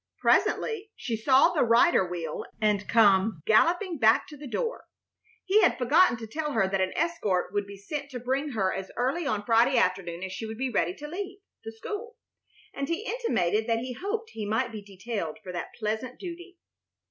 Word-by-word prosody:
Presently 445 -2 +1
she 235 - -3
saw 260 +8 +5
the 310 - +1
rider 235 - +5
wheel 170 -3 -4 0.2
and 210 -2 +1
come 200 -5 +4
galloping 340 - +3
back 220 0 +4
to 300 - -10
the 290 0 -9
door. 465 - -3 0.6
He 405 +3 +4
had 360 - +3
forgotten 275 +2 +4
to 225 - -7
tell 300 +6 -3
her 195 - +2
that 190 0 0
an 185 - 0
escort 215 - 0
would 205 -1 -1
be 200 0 -10
sent 280 +8 -5
to 255 -3 -6
bring 265 +4 -2
her 195 -4 0
as 190 0 -5
early 275 +6 0
on 210 -6 -1
Friday 240 +3 +4
afternoon 185 -4 0
as 190 - -4
she 220 +4 -5
would 220 0 -7
be 260 +1 -2
ready 180 -4 0
to 295 - -8
leave 380 +4 -6 0.3
the 225 - -6
school, 415 - -7 0.6
and 275 0 -4
he 335 +6 -2
intimated 220 - 0
that 230 -1 +2
he 250 +2 -4
hoped 430 - -4
he 220 - -6
might 225 +4 0
be 215 -2 -7
detailed 200 -3 -5
for 185 - -7
that 175 -1 -6
pleasant 220 +3 -3
duty. 355 0 -8
235 Hz, 195 wpm, -27 LUFS, 205-325 Hz, 0.6 s, saw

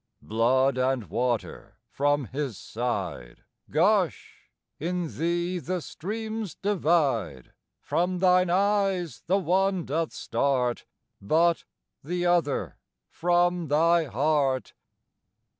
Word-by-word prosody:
Blood 130 +4 +2
and 130 -8 0
water 120 +1 -2
from 145 0 +1
His 130 -3 -4
side 115 - -4 0.3
Gush; 180 +1 0 0.3
in 175 0 -3
thee 175 +2 -1
the 180 +2 -3
streams 215 +4 -5
divide: 150 - 0 0.3
From 180 +1 -1
thine 180 0 +4
eyes 195 -2 +1
the 190 +3 +3
one 190 0 +1
doth 160 +3 -1
start, 125 -3 -1 0.4
But 165 +10 +2 0.4
the 175 +4 -2
other 170 -5 0 0.3
from 175 0 +1
thy 165 +3 +3
heart. 135 0 0
165 Hz, 95 wpm, -26 LUFS, 135-180 Hz, 0.4 s, thine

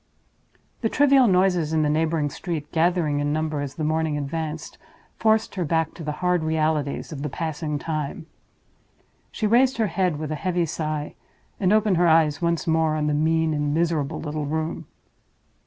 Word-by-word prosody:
The 225 - +1
trivial 275 -2 +5
noises 180 -4 +2
in 155 -1 +2
the - - +2
neighboring 155 -1 0
street, 155 -4 -5
gathering 165 -3 +1
in 145 0 0
number 155 -1 -1
as 140 -2 -5
the 155 - -4
morning 155 0 0
advanced, 155 +2 -5 0.4
forced 220 0 +2
her 185 - -2
back 160 0 0
to 165 - -9
the 150 - -2
hard 180 -2 +2
realities 155 -2 -1
of 145 -3 -6
the 150 - -3
passing 155 0 -3
time. 155 0 -4 1.1
She 215 - -3
raised 250 +4 +3
her 225 - +2
head 180 -5 +1
with 155 0 -5
a 155 - -4
heavy 180 -2 0
sigh, 155 -1 -3 0.5
and 185 -2 +2
opened 210 -3 +3
her 175 0 +4
eyes 160 -2 +3
once 170 -2 0
more 160 -1 +2
on 150 -1 -1
the 150 - +1
mean 160 +1 +1
and 150 0 -1
miserable 160 -2 0
little 150 -1 -4
room. 160 +2 -3
160 Hz, 175 wpm, -24 LUFS, 150-175 Hz, 1.1 s, trivial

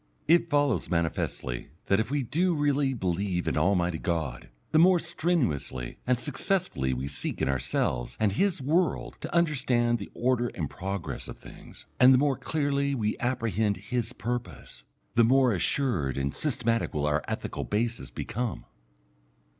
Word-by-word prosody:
It 170 +1 +4
follows 145 -4 +1
manifestly 80 -7 -2 0.2
that 100 - +3
if 110 - -1
we 140 0 0
do 170 +8 +1
really 145 -2 +1
believe 90 -2 -1
in - - 0
Almighty 90 -4 +2
God, 80 -9 -3 0.2
the 155 - +5
more 180 +2 +6
strenuously 160 - -1
and 125 -1 +3
successfully 145 - -1
we 65 +1 -3
seek 70 - -3
in - - +1
ourselves - - -1
and 105 - +3
His 170 - 0
world 165 +6 0
to - - -5
understand 130 -8 +2
the - - -7
order 125 -1 +1
and 80 -5 -2
progress 95 0 -5
of - - -8
things, - - -14
and 130 +1 +8
the - - +5
more 140 0 +2
clearly 140 -1 0
we 105 -4 0
apprehend 110 -5 0
His 115 +5 -2
purpose, 120 +3 -5 0.3
the 115 - +5
more 130 0 +4
assured 90 - 0
and 70 0 -1
systematic 115 - 0
will 75 -1 0
our 75 0 +1
ethical - - -3
basis 115 +3 -2
become. 115 - -4
120 Hz, 155 wpm, -28 LUFS, 90-140 Hz, 0.3 s, and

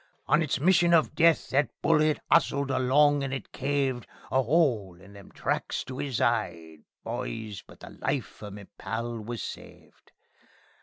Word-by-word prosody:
On 150 - +3
its 150 -4 -1
mission 175 +1 +4
of 155 -2 +2
death 165 0 +3
that 140 +2 +2
bullet 155 -1 +3
'ustled 140 -1 +3
along, 140 +3 +3
and 135 - -3
it 135 - -5
caved 135 -3 -1 0.2
A - - +2
'ole 120 - +1
in 100 +2 -15
them 100 -1 -14
tracts - - -2
to 130 0 -8
'is 135 -5 -2
'ide, 85 -9 -1 0.2
boys 105 - -5
but - - -18
the - - -10
life 135 -4 -4
o' 105 - -7
me 100 0 -10
pal 115 +3 -4
was 115 +2 -5
saved. - - -11
130 Hz, 160 wpm, -27 LUFS, 110-145 Hz, 0.2 s, mission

